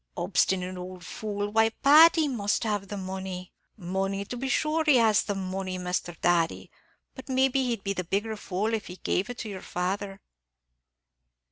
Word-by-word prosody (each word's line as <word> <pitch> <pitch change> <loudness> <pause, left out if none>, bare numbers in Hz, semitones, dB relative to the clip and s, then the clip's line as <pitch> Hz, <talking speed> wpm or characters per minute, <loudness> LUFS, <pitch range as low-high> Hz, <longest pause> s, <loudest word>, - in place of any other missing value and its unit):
'" - - -33
"Obstinate 185 -1 0
ould 180 0 -8
fool! 205 -1 -4
why, 225 +1 +4
Pat, 300 +8 +7
he 320 -3 +2
must 210 -7 0
have 205 -3 -1
the 205 - -5
money." 190 -1 -6 0.2
"Money, 195 +1 -2
to 245 - -6
be 265 +2 -3
shure 310 +3 +1
he 300 -3 +5
has 220 -3 +4
the 205 - -3
money, 185 -1 -3
Misthur 180 -2 -3
Thady; 170 -2 +1 0.4
but 260 +1 -11
maybe 265 +1 +2
he'd 230 -4 -2
be 200 - -1
the 185 - -3
bigger 205 +5 -2
fool 205 +2 -2
if 220 -3 -2
he 180 - -8
gave 185 +3 -1
it 245 - -6
to 220 - -5
your 190 -2 -6
father." 195 +2 -3
200 Hz, 180 wpm, -27 LUFS, 185-225 Hz, 0.4 s, Pat